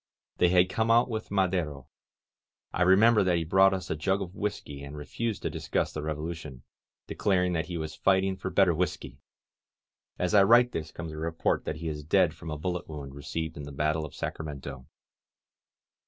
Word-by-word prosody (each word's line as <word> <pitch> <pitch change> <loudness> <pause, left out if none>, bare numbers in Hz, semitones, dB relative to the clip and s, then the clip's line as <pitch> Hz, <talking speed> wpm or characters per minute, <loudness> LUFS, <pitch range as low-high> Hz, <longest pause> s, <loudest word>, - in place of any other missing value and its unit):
They 90 - +4
had 90 0 +5
come 110 +4 -1
out 120 +2 +4
with 110 -1 -4
Ma 95 -1 +3
dero. 90 - -3 0.2
• - - -11
• 70 - -11
• - - -25 0.9
I - - -2
remember 105 +4 +6
that 90 -2 +2
he 85 - 0
brought 95 +4 +5
us 95 -1 -3
a - - 0
jug 95 +6 0
of 95 -2 -6
whisky, 100 -9 -4
and 70 +1 -8
refused 110 +9 -4
to - - 0
discuss - - -2
the 75 - -4
Revolution, 75 -3 -5 0.4
declar 95 -3 +1
ing 90 - 0
that 80 -1 -1
he 90 -1 -4
was 80 -1 -4
fighting 95 0 +2
for 95 - -5
better 95 -2 +4
whisky! 90 +1 -3 1.0
As 90 +3 -1
I 100 - +7
write 120 +4 +6
this 80 -5 -4
comes 85 -2 -7
a 75 - -8
report 80 +1 -1
that - - -2
he 80 +1 -6
is 75 -1 -4
dead 85 +1 +3
from 85 0 -9
a 75 - -3
bullet 90 +2 -3
wound 70 -3 -7
received 80 +3 -5
in 75 - -6
the 70 - -8
battle 75 +3 0
of 75 - -8
Sacramento. 70 -4 -6
85 Hz, 210 wpm, -28 LUFS, 75-95 Hz, 1.0 s, I